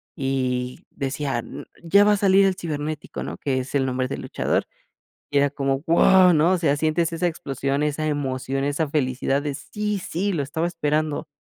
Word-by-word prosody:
y 130 Hz, -3 st, -2 dB
decía: 135 Hz, -2 st, -3 dB
"N -, -, -8 dB, 0.2 s
ya 200 Hz, +5 st, +5 dB
va 210 Hz, -, +5 dB
a -, -, +1 dB
salir 195 Hz, 0 st, +5 dB
el 190 Hz, -1 st, +2 dB
Cibernético", 155 Hz, -3 st, -5 dB
¿no?, -, -, -6 dB
que 130 Hz, -2 st, -1 dB
es 130 Hz, +2 st, -5 dB
el 135 Hz, -1 st, +2 dB
nombre 130 Hz, 0 st, -1 dB
del 135 Hz, -, -5 dB
luchador, -, -, -1 dB, 0.7 s
y 145 Hz, -, +2 dB
era 140 Hz, 0 st, +3 dB
como, 135 Hz, -1 st, -1 dB
¡guau!, 180 Hz, +2 st, +5 dB
¿no?, 160 Hz, +4 st, +4 dB
o -, -, +2 dB
sea, 145 Hz, -4 st, +1 dB
sientes 160 Hz, +2 st, +1 dB
esa 165 Hz, +2 st, 0 dB
explosión, 140 Hz, -3 st, -2 dB
esa 150 Hz, +1 st, -1 dB
emoción, 135 Hz, -2 st, -2 dB
esa 145 Hz, +2 st, 0 dB
felicidad 135 Hz, -1 st, 0 dB
de, 145 Hz, -2 st, -3 dB
¡sí!, 210 Hz, +3 st, -3 dB
¡sí! 190 Hz, +4 st, -2 dB
lo 145 Hz, -4 st, 0 dB
estaba 160 Hz, +4 st, -2 dB
esperando. 155 Hz, -2 st, -1 dB
150 Hz, 190 wpm, -23 LUFS, 135-170 Hz, 0.7 s, ya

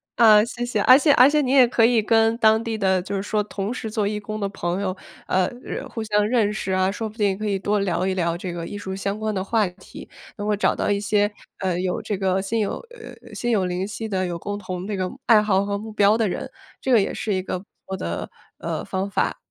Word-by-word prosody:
啊， 215 Hz, -3 st, +7 dB
谢 240 Hz, 0 st, -4 dB
谢， 230 Hz, -4 st, -1 dB
而 255 Hz, -, +8 dB
且 290 Hz, +1 st, +4 dB
而 260 Hz, 0 st, +7 dB
且 300 Hz, 0 st, +2 dB
你 260 Hz, -3 st, -1 dB
也 265 Hz, -3 st, +7 dB
可 235 Hz, -1 st, +3 dB
以 235 Hz, -1 st, +4 dB
跟 225 Hz, +1 st, +3 dB
当 220 Hz, -1 st, +4 dB
地 225 Hz, -1 st, -3 dB
的 190 Hz, -3 st, +2 dB
就 195 Hz, +2 st, -5 dB
是 195 Hz, -, -1 dB
说 210 Hz, +1 st, -1 dB
同 205 Hz, 0 st, -4 dB
时 225 Hz, -3 st, -5 dB
做 210 Hz, -2 st, 0 dB
义 210 Hz, +1 st, -2 dB
工 215 Hz, +1 st, -6 dB
的 200 Hz, -, -1 dB
朋 180 Hz, -1 st, -3 dB
友， 185 Hz, -2 st, -2 dB, 0.3 s
呃， 185 Hz, -1 st, +2 dB, 0.2 s
认 275 Hz, -, -6 dB
互 230 Hz, -2 st, -5 dB
相 210 Hz, -1 st, +1 dB
认 220 Hz, -3 st, +2 dB
识 195 Hz, -3 st, -3 dB
啊， 185 Hz, 0 st, +2 dB
说 220 Hz, +2 st, -4 dB
不 215 Hz, -, -17 dB
定 200 Hz, -3 st, +1 dB
可 215 Hz, -, -5 dB
以 200 Hz, -2 st, 0 dB
多 205 Hz, +2 st, 0 dB
聊 185 Hz, -1 st, 0 dB
一 190 Hz, -, 0 dB
聊 170 Hz, -2 st, -1 dB
这 180 Hz, 0 st, -5 dB
个 170 Hz, -1 st, -5 dB
艺 205 Hz, -, -6 dB
术 190 Hz, -2 st, -5 dB
相 195 Hz, +2 st, -3 dB
关 215 Hz, 0 st, -2 dB
的 190 Hz, -, -1 dB
话 215 Hz, +1 st, +1 dB
题， 180 Hz, +1 st, -12 dB, 0.3 s
能 205 Hz, -, -4 dB
够 210 Hz, -, +2 dB
找 205 Hz, -, +2 dB
到 -, -, -2 dB
一 200 Hz, -1 st, +1 dB
些， 205 Hz, 0 st, +2 dB, 0.3 s
呃， 185 Hz, -2 st, -1 dB
有 185 Hz, -1 st, -2 dB
这 205 Hz, -, -3 dB
个 190 Hz, 0 st, +1 dB
心 225 Hz, +4 st, -2 dB
有 200 Hz, -, -1 dB, 0.2 s
呃 485 Hz, -2 st, -11 dB, 0.2 s
呃， -, -, -12 dB
心 240 Hz, -, -1 dB
有 200 Hz, -5 st, +2 dB
灵 180 Hz, +1 st, -2 dB
犀 220 Hz, +2 st, -5 dB
的 190 Hz, -3 st, -1 dB
有 175 Hz, -1 st, -4 dB
共 205 Hz, +4 st, -4 dB
同 185 Hz, -2 st, -6 dB
这 210 Hz, -, -2 dB
个 185 Hz, -1 st, -2 dB, 0.2 s
爱 220 Hz, -3 st, +6 dB
好 200 Hz, -2 st, +2 dB
和 200 Hz, 0 st, -2 dB
目 220 Hz, +2 st, -8 dB
标 210 Hz, 0 st, +4 dB
的 225 Hz, -2 st, +1 dB
人， -, -, -4 dB, 0.3 s
这 265 Hz, -, -1 dB
个 225 Hz, -, +6 dB
也 -, -, -2 dB
是 210 Hz, -, -2 dB
一 185 Hz, -, 0 dB
个 185 Hz, -, -3 dB
不 190 Hz, -, -16 dB, 0.2 s
错 190 Hz, -, -5 dB
的， 85 Hz, -, -4 dB, 0.3 s
呃， -, -, -3 dB
方 190 Hz, +1 st, -3 dB
法。 -, -, 0 dB
205 Hz, 290 characters per minute, -23 LUFS, 190-220 Hz, 0.3 s, 而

